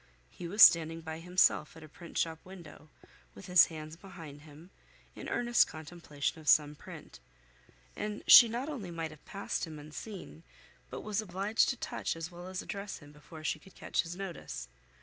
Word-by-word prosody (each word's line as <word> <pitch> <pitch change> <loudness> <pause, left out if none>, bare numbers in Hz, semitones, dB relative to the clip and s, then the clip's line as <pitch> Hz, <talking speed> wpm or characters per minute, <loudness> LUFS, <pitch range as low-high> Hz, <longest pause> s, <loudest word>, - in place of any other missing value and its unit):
He 175 - -8
was 205 +5 +6
standing 165 0 +6
by 160 0 -6
himself 175 -2 +2
at 160 - -12
a - - -11
printshop 165 0 -4
window, 175 -4 -13 0.5
with 195 - -11
his 180 -1 +6
hands 155 -1 -8
behind 165 -6 -11
him, 155 +4 -15 0.4
in - - -7
earnest 240 0 +3
contemplation 155 0 -5
of 150 - -2
some 150 -1 +5
print, 145 - -12 0.8
and 210 0 -5
she 235 - +10
not 240 +5 -3
only 250 - -6
might 165 -2 -5
have 155 - -15
passed 195 -2 -4
him 155 -1 -9
unseen, 160 +4 -9 0.5
but - - -6
was 210 0 -2
obliged 200 +2 +1
to 260 - -2
touch - - -3
as 165 +1 -6
well 175 +1 -10
as 185 0 -5
address 200 0 -6
him 145 -1 -15
before 150 +2 -13
she 155 - -1
could 190 +5 -18
catch - - -1
his 170 0 -7
notice. 180 - -7
170 Hz, 180 wpm, -31 LUFS, 155-195 Hz, 0.8 s, she